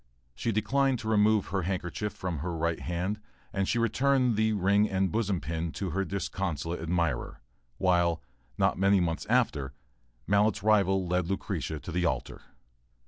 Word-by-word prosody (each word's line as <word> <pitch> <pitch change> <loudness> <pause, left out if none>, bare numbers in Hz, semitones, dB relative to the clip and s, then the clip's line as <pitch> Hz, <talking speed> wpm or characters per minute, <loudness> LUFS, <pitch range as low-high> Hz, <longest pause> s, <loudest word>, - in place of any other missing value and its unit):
She 115 - -2
declined 135 +5 +1
to 110 - -6
remove 105 -1 +3
her 95 0 0
handkerchief 95 +3 -3
from 90 -5 -4
her 85 +2 -3
right 85 +1 0
hand 90 +5 -3 0.3
and 95 -2 0
she 120 - +1
returned 125 +1 +2
the 110 +1 +2
"ring 100 +1 +3
and 95 -1 0
bosom 105 -5 0
pin" 80 0 -3
to 95 -3 -3
her 95 +3 0
disconsolate 90 -3 -3
admirer, 85 -7 -1 0.4
while, 85 -3 +2 0.3
not - - +2
many 100 0 +4
months 85 -2 -1
after, 75 - +1 0.5
Mallett's 105 0 +2
rival 95 -3 +3
led 90 0 0
Lucretia 80 -6 -3
to 90 - -7
the 90 +1 0
altar. 65 -4 -3
95 Hz, 155 wpm, -29 LUFS, 85-105 Hz, 0.5 s, many